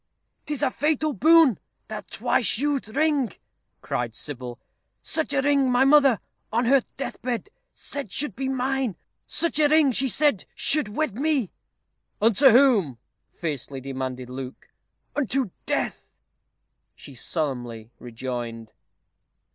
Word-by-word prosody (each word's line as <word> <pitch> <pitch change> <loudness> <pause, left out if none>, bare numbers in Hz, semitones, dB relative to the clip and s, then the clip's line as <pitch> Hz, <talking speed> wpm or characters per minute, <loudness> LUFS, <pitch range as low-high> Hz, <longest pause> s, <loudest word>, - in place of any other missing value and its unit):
"'Tis 295 -3 -2
a - - +2
fatal 305 +1 0
boon, 315 - +5 0.3
that - - -7
twice 225 - +1
used 280 -2 0
ring," 295 - +2 0.5
cried 120 -2 -3
Sybil; 125 -4 -5 0.5
"such 320 -3 0
a 280 -1 +1
ring 280 -2 +3
my 250 +2 +4
mother, 275 -5 +5 0.3
on 235 +2 +1
her 270 +2 +5 0.2
death 275 - -5
bed, 250 - -3 0.2
said 280 -9 -6
should 270 -1 0
be 265 +1 -3
mine. 265 -4 -1 0.3
Such 335 -2 +1
a 300 - +5
ring 305 -2 +4
she 265 +2 0
said 285 -5 +1
should 300 -6 +2
wed 235 +1 -2
me 285 - 0 0.3
" - - -52
"Unto 230 +5 +5
whom?" 225 - +4 0.3
fiercely 145 -4 -4
demanded 130 -1 -5
Luke. 130 +1 -8 0.5
"UNTO 265 -5 0 0.2
DEATH!" - - -3 0.8
she 140 - -12
solemnly 120 -5 -4
rejoined. 120 -2 -6
250 Hz, 130 wpm, -25 LUFS, -, 0.8 s, boon